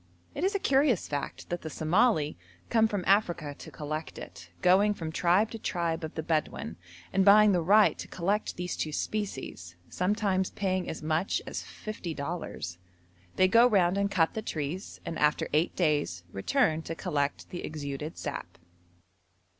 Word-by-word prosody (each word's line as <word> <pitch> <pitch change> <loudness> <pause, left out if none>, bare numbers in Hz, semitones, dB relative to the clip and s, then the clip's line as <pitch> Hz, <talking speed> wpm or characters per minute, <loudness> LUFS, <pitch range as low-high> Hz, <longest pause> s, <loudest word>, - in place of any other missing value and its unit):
It 290 - -4
is 390 +2 +1
a - - +2
curious 270 - +2
fact 145 -1 -5
that 175 0 -3
the 160 - -5
Somali 160 -1 +2 0.4
come 225 -1 +5
from 205 -4 -2
Africa 175 -7 +2
to - - -9
collect 155 +1 -5
it, - - -10
going 200 +3 +5
from 160 -4 -5
tribe 180 +7 +2
to 225 - -6
tribe 170 -4 -2
of 155 - -6
the 160 - -3
Bedouin, 155 - -1 0.4
and 195 - +4
buying 210 +1 +7
the 180 -3 +2
right 205 +5 +5
to - - -6
collect 195 +4 -1
these 180 0 -3
two 155 - -2
species, 140 - -4
sometimes 190 0 0
paying 185 -2 -1
as 160 - -6
much 160 +4 0
as - - -4
fifty 190 -6 -6
dollars. 140 - -5 0.6
They 185 - +5
go 230 +5 +6
round 190 -5 +3
and 200 0 +1
cut 165 -4 +2
the 220 - -3
trees, 160 -1 -4
and 165 - -4
after 150 0 +2
eight 155 +4 +2
days 145 - 0
return 160 - +1
to 165 0 -5
collect 145 -6 -2
the 175 - -5
exuded 150 +1 -5
sap. - - -6
175 Hz, 170 wpm, -29 LUFS, 155-205 Hz, 0.6 s, buying